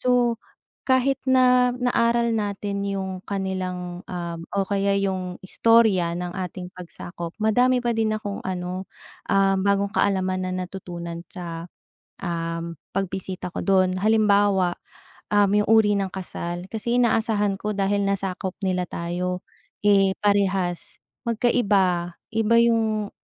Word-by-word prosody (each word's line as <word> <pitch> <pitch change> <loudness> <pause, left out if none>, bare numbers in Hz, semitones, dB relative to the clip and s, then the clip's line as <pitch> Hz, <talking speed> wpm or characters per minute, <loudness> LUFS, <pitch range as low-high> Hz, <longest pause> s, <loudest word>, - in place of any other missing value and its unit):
So, 245 -2 +2 0.5
kahit 260 +1 +3
na 250 -1 +5
naaral 235 -2 +2
natin 200 -1 -2
'yong 190 -2 -3
kanilang, 185 -2 -3
um 170 -2 -4
o 195 -1 0
kaya 200 0 +1
'yong 185 -2 -2
istorya 210 -5 +3
ng 180 0 -4
ating 180 -1 -5
pagsakop, 175 -1 -7
madami 245 +4 +3
pa 235 -1 +1
din 220 -1 +1
akong 205 -2 -5
ano, 185 0 -4 0.4
ah, 195 0 +4
bagong 200 +1 +1
kaalaman 185 -1 +1
na - - -3
natutunan 170 -3 -7
sa, 170 -2 -6 0.6
um, 170 -1 -3 0.2
pagbisita 190 -2 -3
ko - - -3
do'n. 185 -1 +2
Halimbawa, 205 -4 +3 0.6
um, 205 -1 +4
'yong 210 +1 +2
uri 220 -2 +5
ng 195 - -1
kasal, 175 -2 -5
kasi 235 +2 -1
inaasahan 220 -4 +2
ko, 210 - -2
dahil 200 +1 +1
nasakop 190 -1 -2
nila 185 -1 +1
tayo, 180 +2 -3 0.4
eh, 195 -2 +4
parehas. 195 -4 0 0.3
Magkaiba, 200 -7 +1 0.2
iba 225 +1 +3
'yong 220 -3 +2
195 Hz, 125 wpm, -24 LUFS, 180-215 Hz, 0.6 s, na